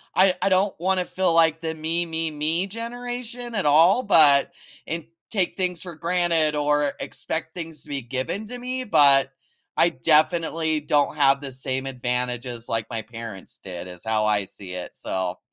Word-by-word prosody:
I 185 0 +4
I - - +1
don't 190 +1 +1
wanna 185 0 0
feel 185 -2 0
like 165 -1 +3
the 160 -1 -3
me, 165 +2 -2
me, 165 -1 -3
me 160 +5 -1
generation 240 +2 -6
at 195 -6 -1
all, 165 - +4
but 150 -8 +7 0.3
and 165 -1 -5 0.3
take 190 -5 -1
things 180 -3 -2
for 175 -3 -6
granted 165 -2 +1
or 145 -1 +1
expect 160 0 -4
things 165 -3 -4
to - - -12
be 140 -2 -3
given 130 - -4
to 245 +3 -6
me, 255 +1 -5
but, 140 - +6 0.5
I - - +4
definitely 160 0 +1
don't 145 0 +1
have 140 -1 +3
the 135 -2 -7
same 130 +1 -4
advantages 125 -1 -2
like 115 -1 -1
my 115 -1 -3
parents 115 -3 -7
did 90 -1 -9
is 90 -1 -7
how 110 -1 0
I 105 -1 +1
see 95 -1 -9
it, 90 -1 -7
so, 95 -1 -3
155 Hz, 175 wpm, -23 LUFS, 130-180 Hz, 0.5 s, but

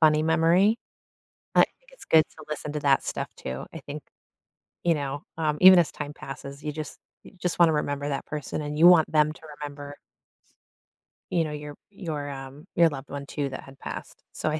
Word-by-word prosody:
funny 155 -1 +5
memory, 170 +6 +4 0.8
I - - +8
think - - -27
it's - - -14
good 160 -1 +6
to 155 - -11
listen 150 -1 -4
to 150 - -1
that 140 -2 +3
stuff - - -3
too, 65 +1 -5
I - - -6
think, - - -6 0.8
you 170 - +4
know, 145 0 -4
um, 155 -2 0
even 185 -1 +10
as 170 - +2
time 145 -1 -6
passes, 140 0 -9
you 150 - -2
just 155 0 -6 0.3
you - - -13
just 175 0 -2
want 170 - +7
to 160 - +2
remember 145 -1 -1
that 140 - -3
person 150 0 -4
and 150 0 -4
you 170 - +9
want 175 -3 +6
them 155 0 +3
to - - -18 0.2
remember 145 0 -7 1.4
you 170 - +2
know, 155 - -4
your 150 0 -7 0.2
your, 160 -8 -4
um, 135 +2 -8
your 170 -1 +6
loved 140 -2 -8
one 140 0 -5
too 140 0 -3
that 130 - -7
had 135 0 -14
passed, - - -8
so - - -1
I 155 0 -1
150 Hz, 205 wpm, -26 LUFS, 145-160 Hz, 1.4 s, even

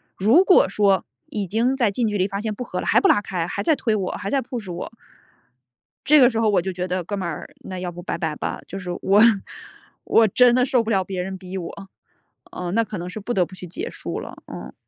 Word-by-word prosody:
如 230 - +5
果 370 - +5
说， 195 -1 +2 0.3
已 205 -2 -2
经 230 +7 +1
在 235 -6 +2
近 230 +3 0
距 210 -1 -1
离 190 0 +1
发 200 0 -4
现 215 0 -3
不 250 - -5
和 - - -5
了， - - -4
还 - - +4
不 395 - +4
拉 205 - +4
开， 180 -4 -3
还 200 +3 -3
在 315 - +3
推 225 -5 0
我、 190 -3 -2
还 195 0 -5
在 275 - +1
push 230 -6 -6
我， 175 - -6 1.1
这 300 +1 +6
个 250 - +7
时 225 -3 -2
候 225 -1 +3
我 200 -3 +3
就 190 +2 -3
觉 180 0 -3
得： 185 0 -2
“哥 205 +3 -3
们 185 -3 -3
儿， 165 - -6
那 185 -1 -7
要 180 -1 -4
不 175 +1 -9
拜 175 - -3
拜 160 -3 -2
吧。” - - -4
就 195 - -6
是 180 -2 -5
我 200 +2 +4 0.8
我 225 - +5
真 245 +4 +5
的 250 - +4
受 255 -2 +2
不 225 - -4
了 195 -4 +2
别 185 -1 -4
人 190 +1 -5
逼 185 0 -7
我， 190 +2 -7 0.6
嗯， 180 -1 -4
那 230 - +3
可 210 -1 -6
能 175 +1 -5
是 200 - -6
不 230 +4 -3
得 185 -5 +2
不 185 - -13
去 185 - -9
结 350 - -5
束 - - -5
了， - - -9
嗯。 - - -8
200 Hz, 290 characters per minute, -22 LUFS, 185-230 Hz, 1.1 s, 个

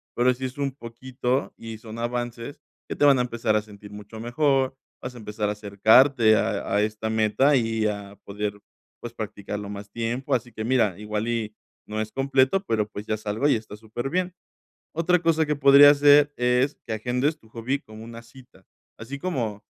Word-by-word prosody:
pero 125 +1 +3
si 130 +1 -5
es 130 +3 -7
un 140 -1 -1
poquito 125 +1 -3
y 115 -1 -8
son 110 0 -10
avances 120 +2 -4 0.3
que - - -5
te - - -1
van 140 -2 +6
a 125 - +2
empezar 115 -3 -1
a 105 - +1
sentir 105 -1 -13
mucho 105 +2 -10
mejor. 135 +2 +1 0.3
Vas 125 0 -7
a - - -10
empezar 105 -2 -3
a - - -1
acercarte 110 +3 +4
a - - -1
a 105 - +3
esta 110 +1 -3
meta 110 +6 +3
y 115 -3 +1
a 100 -1 -5
poder, 105 0 -4 0.5
pues, 120 -1 -7
practicarlo 105 -1 -6
más 100 0 -8
tiempo. 120 +5 -2
Así 120 0 -4
que 110 - -5
mira, 110 -6 +1
igual 105 +1 -3
y 110 -2 -3 0.3
no 110 0 -4
es 110 0 -3
completo, 135 +6 +2
pero 105 -2 0
pues 105 0 -9
ya 110 - 0
es 110 +1 -13
algo 110 +8 0
y - - +4
está 110 -1 -7
superbién. 135 +12 -3 0.6
Otra 175 +2 +2
cosa 165 -1 +2
que 150 - -1
podrías 140 +1 +7
hacer, 145 0 +6
es 125 +3 +1
que 110 - -2
agendes 125 +7 -1
tu 110 - -22
hobby 120 +5 -2
como 110 -2 -12
una 115 0 -10
cita, 120 -5 -18 0.3
así 135 +5 -7
como 120 - -3
115 Hz, 195 wpm, -24 LUFS, 110-135 Hz, 0.6 s, podrías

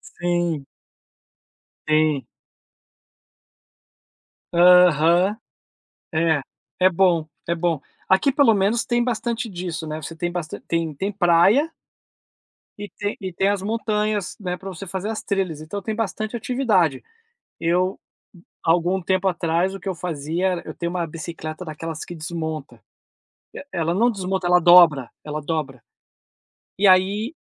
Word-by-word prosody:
Sim. 175 -4 -1 1.2
Sim. 155 -2 +2 2.3
Aham. 180 +2 +5 0.8
É. 160 -2 +2 0.4
É 185 0 +6
bom, 175 -3 +2 0.2
é 170 - 0
bom. 170 -2 0 0.3
Aqui 190 +9 +4
pelo 275 -5 +4
menos 205 +4 +1
tem 240 -1 +1
bastante 235 -1 -2
disso, 175 -3 -5
né, 155 +1 -5
você 165 +2 -7
tem 175 +2 -2
bastan 175 -3 -5
tem 165 -2 -1
tem 195 +8 -3
praia 195 - +3 1.0
e 205 0 -6
tem 205 0 -4 0.2
tem 190 +3 +1
as 205 -2 0
montanhas, 210 -2 -1
né, 180 -3 -3
pra 195 +1 -8
você 195 +1 -8
fazer 190 +3 -4
as 220 - -4
trilhas. 185 -6 -2
Então 195 +6 -6
tem 220 +1 -3
bastante 215 +1 -3
atividade. 210 - +1 0.6
Eu, 180 +3 0 0.7
algum 175 +3 +2
tempo 190 +2 +1
atrás, 175 +1 0
o 195 - -7
que 195 - -6
eu 190 - -1
fazia 165 +1 -2
era 180 -2 -2
eu - - -7
tenho 170 0 -3
uma 175 -2 -2
bicicleta 160 +1 -7
daquelas 160 0 -6
que 175 - -8
desmonta. 160 -2 -6 0.7
E - - -8
ela 170 -1 0
não 235 +6 +3
desmonta, 190 -3 -3
ela 180 0 +5
dobra, 170 -7 +6
ela 150 0 -4
dobra. 145 -5 -3 1.0
E 200 +1 +4
aí 200 - +3
180 Hz, 135 wpm, -22 LUFS, 165-200 Hz, 2.3 s, É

